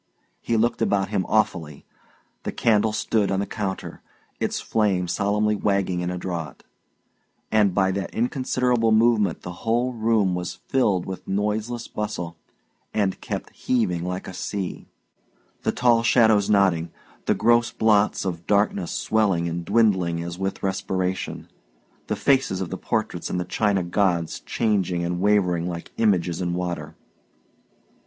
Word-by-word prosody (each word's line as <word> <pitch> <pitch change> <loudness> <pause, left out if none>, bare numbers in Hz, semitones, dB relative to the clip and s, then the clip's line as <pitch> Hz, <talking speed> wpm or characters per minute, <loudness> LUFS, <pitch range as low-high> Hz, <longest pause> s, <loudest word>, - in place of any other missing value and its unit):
He 115 - 0
looked 115 +1 +1
about 95 -1 +1
him 100 -4 -1
awfully. 85 -8 0 0.6
The - - -4
candle 110 -1 +2
stood 110 -1 0
on 95 - 0
the 100 - 0
counter, 100 -3 -5 0.4
its - - -1
flame 100 -5 +1
solemnly 105 +3 +1
wagging 100 -3 0
in 90 0 -2
a 90 - -3
draught; 85 -5 -5 0.9
and 105 -4 +3
by 95 -1 +3
that 95 +1 -3
inconsiderable 125 -1 +1
movement 110 -4 +3
the 90 - -5
whole 120 +3 +1
room 110 -4 +2
was 90 -1 -3
filled 105 -9 0
with 95 -1 -7
noiseless 105 +4 -2
bustle 90 -5 -4 0.6
and 100 -3 0
kept - - -5
heaving 100 -9 0
like 90 +1 -4
a - - -7
sea: 95 +1 -4 0.7
the - - +1
tall 120 -2 +3
shadows 110 -3 +4
nodding, 95 -5 +3 0.4
the - - +3
gross 120 0 +3
blots 105 -2 +2
of 85 -2 -4
darkness 100 -3 +1
swelling 95 -6 +1
and 85 0 -4
dwindling 95 -6 +2
as 85 +1 -6
with 95 0 -3
respiration, 95 -1 -2 0.6
the - - -1
faces 135 -9 +2
of 95 -3 -4
the - - -2
portraits 110 -4 -2
and 90 - -1
the 90 - -2
china 100 -3 +1
gods 85 -2 0
changing 95 -6 0
and 90 +1 -2
wavering 90 -4 +2
like 85 -1 -7
images 90 -5 +1
in 85 -1 -1
water. 85 -4 -4
100 Hz, 145 wpm, -24 LUFS, 90-110 Hz, 0.9 s, shadows